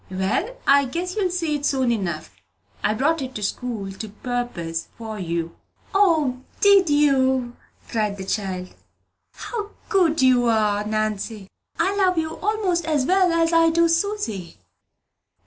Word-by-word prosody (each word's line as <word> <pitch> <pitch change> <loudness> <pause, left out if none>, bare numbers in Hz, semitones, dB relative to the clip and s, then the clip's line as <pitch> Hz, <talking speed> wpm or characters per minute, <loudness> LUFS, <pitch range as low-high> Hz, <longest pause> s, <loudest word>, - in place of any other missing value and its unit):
"Well, 190 - -1
I 280 0 +5
guess 350 +7 -4
you'll 400 -4 +1
see 340 -4 -1
it 290 - -4
soon 265 -4 +1
enough. 175 -8 -3 0.5
I 210 +1 +2
brought 300 +6 +1
it 260 -1 -6
to 210 - -4
school 205 -2 -3
to 210 +3 -7
purpose 205 -8 -4
for 220 -2 -6
you." 170 -2 -3 0.4
"O, 320 -10 +3 0.2
did 400 -4 +5
you?" 265 -4 +2 0.3
cried 210 -3 -1
the 190 - -6
child. 190 -3 -3 0.6
"How 430 -4 -5 0.2
good 335 -8 +3
you 250 -2 +4
are, 210 -2 +2
Nanny. 215 -1 -3 0.3
I 390 +1 +1
love 370 -3 +2
you 320 -1 0
'most 395 -5 0
as 300 -5 +1
well 370 +2 +3
as 335 0 +2
I 330 0 +5
do 335 +1 +3
Susy." 330 - -2
260 Hz, 145 wpm, -23 LUFS, 210-335 Hz, 0.6 s, I